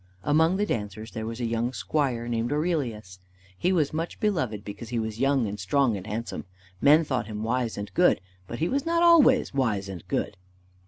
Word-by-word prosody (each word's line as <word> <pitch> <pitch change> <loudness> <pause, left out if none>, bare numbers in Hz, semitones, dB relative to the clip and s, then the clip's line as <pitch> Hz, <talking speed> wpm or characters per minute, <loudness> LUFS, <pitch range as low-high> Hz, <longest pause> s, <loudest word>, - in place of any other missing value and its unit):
Among 160 +5 +3
the 205 - +1
dancers 105 - -4
there 110 -1 -5
was 115 +1 -5
a 120 - -1
young 115 +2 -1
squire 130 -7 -1
named 115 +1 -1
Aurelius. 130 - -2 0.4
He 180 - 0
was 155 -6 +1
much 165 +2 -4
beloved 130 - -1
because 105 +2 -8
he 120 - -2
was 110 -1 -3
young, 135 -2 +2
and 105 0 -5
strong, 125 +4 +2
and 95 +1 -7
handsome. 115 +3 -4 0.4
Men 150 +3 +6
thought 130 -7 -2
him 105 -1 -5
wise 120 0 -1
and 100 0 -6
good, 180 0 +4 0.3
but 120 - -5
he 165 - 0
was 275 +5 0
not 335 +1 +1
always 305 - +5
wise 110 -8 0
and 95 -4 -7
good. - - -2
120 Hz, 200 wpm, -26 LUFS, 110-155 Hz, 0.4 s, Men